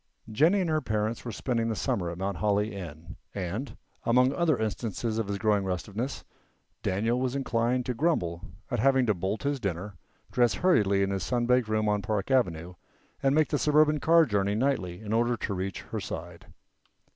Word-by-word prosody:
Jennie 160 Hz, -, +4 dB
and 175 Hz, -, -1 dB
her 155 Hz, 0 st, +1 dB
parents 110 Hz, 0 st, -2 dB
were 120 Hz, -, -5 dB
spending 115 Hz, +1 st, -1 dB
the 110 Hz, -, -1 dB
summer 90 Hz, -4 st, -1 dB
at 85 Hz, -, -6 dB
Mount 95 Hz, 0 st, -2 dB
Holly 105 Hz, +1 st, +1 dB
Inn, 85 Hz, -2 st, -8 dB, 0.2 s
and, 100 Hz, +8 st, -4 dB, 0.3 s
among 125 Hz, +3 st, +3 dB
other 160 Hz, -3 st, +2 dB
instances 110 Hz, +1 st, -2 dB
of 110 Hz, -, -1 dB
his 100 Hz, 0 st, -2 dB
growing 105 Hz, -1 st, +2 dB
restiveness, 100 Hz, +8 st, -3 dB, 0.6 s
Daniel 115 Hz, +6 st, 0 dB
was 130 Hz, 0 st, -1 dB
inclined 125 Hz, -2 st, 0 dB
to 125 Hz, -, -1 dB
grumble 105 Hz, -, 0 dB, 0.3 s
at 120 Hz, -, 0 dB
having 130 Hz, +2 st, +4 dB
to 110 Hz, -, +3 dB
bolt 95 Hz, +4 st, -3 dB
his 140 Hz, -1 st, 0 dB
dinner, 100 Hz, -1 st, -3 dB, 0.4 s
dress 120 Hz, -4 st, +3 dB
hurriedly 100 Hz, -, +3 dB
in 100 Hz, -, 0 dB
his 95 Hz, -1 st, -2 dB
sun 120 Hz, +8 st, 0 dB
baked 125 Hz, -1 st, +3 dB
room 110 Hz, 0 st, 0 dB
on 105 Hz, -1 st, +1 dB
Park 105 Hz, +3 st, -2 dB
avenue, 90 Hz, -9 st, +1 dB, 0.5 s
and 135 Hz, 0 st, +3 dB
make 155 Hz, -1 st, +3 dB
the 145 Hz, -, 0 dB
suburban 150 Hz, 0 st, +4 dB
car 165 Hz, +2 st, +5 dB
journey 100 Hz, -4 st, 0 dB
nightly 110 Hz, -8 st, -1 dB
in 110 Hz, 0 st, -4 dB
order 120 Hz, +1 st, +2 dB
to 105 Hz, -, -3 dB
reach 95 Hz, +1 st, -3 dB
her -, -, -5 dB
side. -, -, -7 dB
110 Hz, 190 wpm, -28 LUFS, 100-130 Hz, 0.6 s, car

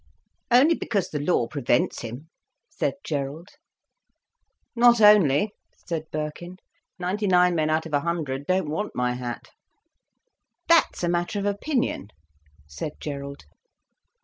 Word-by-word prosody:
"Only 260 Hz, +7 st, +6 dB
because 205 Hz, -, -2 dB
the 150 Hz, -, -3 dB
law 145 Hz, -4 st, +1 dB
prevents 120 Hz, -4 st, 0 dB
him," 120 Hz, +7 st, -8 dB, 0.4 s
said -, -, -1 dB
Gerald. 150 Hz, +4 st, -4 dB, 1.3 s
"Not 240 Hz, 0 st, +6 dB
only," 210 Hz, -4 st, +5 dB, 0.3 s
said 165 Hz, -3 st, -3 dB
Birkin. 155 Hz, +4 st, -5 dB, 0.4 s
"Ninety 190 Hz, +3 st, -2 dB
nine 180 Hz, -1 st, +4 dB
men 155 Hz, -2 st, +1 dB
out 155 Hz, +1 st, +1 dB
of 160 Hz, -, -9 dB
a 145 Hz, -, +4 dB
hundred 145 Hz, -4 st, -3 dB
don't 185 Hz, -2 st, +1 dB
want 210 Hz, +7 st, -3 dB
my 125 Hz, 0 st, 0 dB
hat." 125 Hz, -1 st, -6 dB, 1.2 s
"That's 335 Hz, -, +3 dB
a -, -, +2 dB
matter 175 Hz, +5 st, -1 dB
of 200 Hz, -, -2 dB
opinion," 205 Hz, -, -1 dB, 0.6 s
said 75 Hz, -, -6 dB
Gerald. 140 Hz, -1 st, -6 dB
165 Hz, 125 wpm, -25 LUFS, 145-200 Hz, 1.3 s, Only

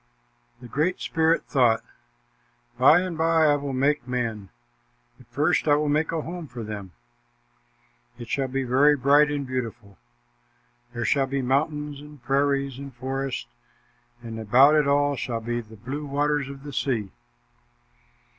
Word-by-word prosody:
The 120 Hz, -, -10 dB
Great 155 Hz, +9 st, -1 dB
Spirit 160 Hz, 0 st, +1 dB
thought, 120 Hz, -5 st, +2 dB, 1.0 s
"By 155 Hz, +7 st, +6 dB
and 180 Hz, -2 st, -4 dB
by 160 Hz, 0 st, +3 dB
I 145 Hz, -1 st, +4 dB
will 140 Hz, -1 st, -4 dB
make 135 Hz, 0 st, 0 dB
men, 115 Hz, -6 st, -3 dB, 0.7 s
but -, -, -18 dB
first 150 Hz, +2 st, 0 dB
I 145 Hz, -, +5 dB
will 150 Hz, 0 st, 0 dB
make 155 Hz, +2 st, +1 dB
a 165 Hz, -1 st, -2 dB
home 170 Hz, 0 st, -7 dB
for 120 Hz, -3 st, -8 dB
them. 105 Hz, -4 st, -7 dB, 1.2 s
It 120 Hz, -, -9 dB
shall 135 Hz, +2 st, -1 dB
be 135 Hz, +1 st, -2 dB
very 135 Hz, +4 st, +4 dB
bright 145 Hz, +2 st, +4 dB
and 145 Hz, -1 st, -2 dB
beautiful. 120 Hz, -6 st, -6 dB, 0.9 s
There 120 Hz, 0 st, -3 dB
shall 135 Hz, -2 st, +2 dB
be 135 Hz, 0 st, -2 dB
mountains 150 Hz, +2 st, -1 dB
and 150 Hz, 0 st, -13 dB
prairies 140 Hz, -1 st, 0 dB
and 140 Hz, 0 st, -8 dB
forests, 130 Hz, -, -4 dB, 0.8 s
and 115 Hz, -1 st, -7 dB
about 125 Hz, +7 st, +5 dB
it 150 Hz, -2 st, +3 dB
all 145 Hz, 0 st, +2 dB
shall 120 Hz, -2 st, -3 dB
be 120 Hz, +1 st, -3 dB
the 110 Hz, -1 st, -15 dB
blue 140 Hz, +7 st, -6 dB
waters 145 Hz, 0 st, 0 dB
of 140 Hz, 0 st, -10 dB
the 145 Hz, -1 st, -8 dB
sea." 115 Hz, -7 st, -1 dB
140 Hz, 155 wpm, -25 LUFS, 125-150 Hz, 1.2 s, By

